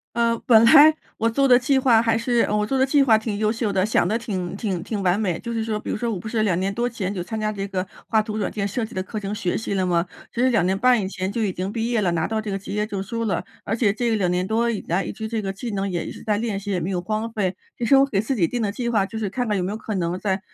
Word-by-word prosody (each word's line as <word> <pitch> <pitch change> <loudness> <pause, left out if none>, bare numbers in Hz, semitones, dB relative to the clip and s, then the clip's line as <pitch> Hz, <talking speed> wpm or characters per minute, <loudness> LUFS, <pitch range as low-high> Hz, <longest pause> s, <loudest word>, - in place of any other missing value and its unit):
呃， 230 0 +2
本 230 -4 +7
来 305 +5 +8 0.2
我 225 - +2
做 275 +5 +2
的 250 -2 +7
计 265 +2 +2
划 245 -4 +5
还 225 0 +2
是 235 +1 +1
呃， 210 - +1
我 210 - +1
做 270 +4 0
的 265 - +4
计 285 +1 +4
划 225 -5 +5
挺 220 -2 -3
优 215 0 +1
秀 225 -3 -2
的， 190 -1 +2
想 215 -4 +2
得 215 - +1
挺 195 -5 -4
挺 195 -6 -2
挺 205 +1 -3
完 185 +2 +2
美。 185 -6 -1
就 235 - -6
是 225 -1 -1
说 220 -1 -2
比 - - -6
如 - - -1
说 235 +2 -2
我 205 - -2
不 180 - -10
是 220 -1 0
2 185 -5 +1
年 190 +2 -1
多 240 +4 -1
前 205 -5 -3
就 185 - -3
参 220 +5 -5
加 215 0 -1
这 200 -1 -4
个 185 -1 -2 0.2
画 220 -1 +3
图 215 0 -5
软 205 - -1
件 200 -2 -2
设 225 +4 -2
计 220 - -9
的 185 - -1
课 210 +3 -6
程 200 0 -4
学 200 -5 -1
习 210 -2 -3
了 190 - +1
吗？ 175 0 +1 0.3
其 235 - -2
实 255 - +4
2 230 -7 +2
年 190 +2 +1
半 250 +1 +4
以 190 - -2
前 190 0 -3
就 225 +2 -2
已 195 - 0
经 185 +2 -3
毕 230 +2 -2
业 235 -2 +2
了， 190 -4 +1
拿 165 -1 0
到 220 -1 -1
这 215 -1 -5
个 195 - -2
职 195 - -8
业 210 0 0
证 200 -3 -4
书 230 +3 -3
了。 190 -6 -1 0.2
而 225 - -1
且 215 -4 +2
这 230 0 0
2 185 -4 +1
年 180 +1 0
多 230 +3 +1
以 220 - -2
来 175 +2 +1
一 - - -5
直 220 - -6
这 220 -1 -2
个 195 - -3
技 230 +5 -6
能 200 0 -1
也 175 -2 -2
一 - - -5
直 - - -10
在 210 -1 +1
练 220 -3 -2
习， 200 +1 -6
也 185 -3 0
没 170 - -2
有 180 -2 -1
荒 215 +4 -2
废。 195 -4 -1 0.2
其 240 - -3
实 270 +4 +5
我 275 0 +5
给 200 -7 0
自 220 +6 -2
己 175 -9 +2
定 240 -2 -2
的 200 - -1
计 235 +3 -3
划， 215 -5 +2
就 220 +3 -6
是 215 - -2
看 245 +6 -2
看 210 -2 0
有 180 - -1
没 185 - -2
有 210 - -3
可 220 0 -5
能 175 0 -1
在 195 -1 -1
215 Hz, 355 characters per minute, -23 LUFS, 195-230 Hz, 0.3 s, 来